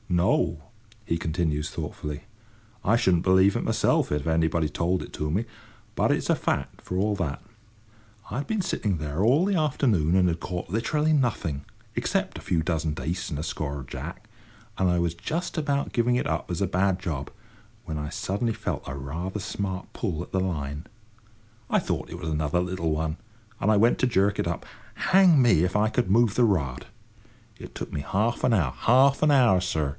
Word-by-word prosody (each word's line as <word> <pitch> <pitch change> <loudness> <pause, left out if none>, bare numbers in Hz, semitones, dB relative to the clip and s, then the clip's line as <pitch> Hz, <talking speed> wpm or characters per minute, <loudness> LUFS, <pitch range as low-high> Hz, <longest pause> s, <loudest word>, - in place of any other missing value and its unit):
"No," 85 -3 +1 0.4
he 85 - 0
continues 80 -2 -1
thoughtfully; 75 +2 -5 0.6
"I 110 - +3
shouldn't 90 -6 +2
believe 95 +1 +4
it - - -1
myself - - +1
if 75 +1 -1
anybody 80 0 +2
told 85 +5 -1
it - - -12
to 75 0 -2
me, 105 +8 0 0.5
but - - +2
it's - - -1
a - - +5
fact, - - -2
for 90 - -4
all 105 +2 +1
that. 85 -8 -3 0.9
I - - -4
had 140 - -4
been 220 -2 0
sitting 100 - -1
there 75 +4 -2
all 135 - +4
the 200 0 +1
afternoon 120 - +2
and 95 -1 +4
had 85 -1 -1
caught 90 -2 -4
literally 150 - +1
nothing—except 95 - -2
a - - -8
few 85 -3 0
dozen 80 -2 -1
dace 80 +3 -3
and 75 - -4
a - - -3
score 70 -3 -3
of 65 - -9
jack; 85 - -7 0.5
and 95 -1 +2
I 90 0 +2
was 85 -1 0
just 165 - -4
about 140 -2 -1
giving 120 0 +2
it - - -1
up - - -2
as 85 - -2
a 100 - +2
bad 95 +1 +1
job 75 -7 -4 0.5
when 80 - -4
I 75 0 -4
suddenly 105 +8 -1
felt - - -4
a 65 - -4
rather 80 +9 -4
smart 95 -2 -4
pull 90 -7 -3
at - - -15
the 95 - +2
line. 75 -4 -3 0.8
I - - +3
thought - - -3
it - - -7
was 80 - -5
another 75 +2 0
little 90 -2 -1
one, 80 0 -1 0.5
and 105 - +3
I 105 - +4
went 115 +4 +4
to 130 - +3
jerk 100 -3 +2
it - - 0
up. 85 - -3 0.3
Hang 185 -6 +5
me, 115 -10 +4
if 90 +2 -1
I 105 +1 +3
could 120 -3 0
move 115 0 +4
the 125 - +4
rod! 75 - 0 0.7
It - - -10
took - - -6
me 75 - -2
half 110 +10 -1
an 120 - +3
hour—half 120 - +3
an 155 - +5
hour, 120 -10 +5
sir! 80 -5 -1
90 Hz, 195 wpm, -26 LUFS, 80-115 Hz, 0.9 s, a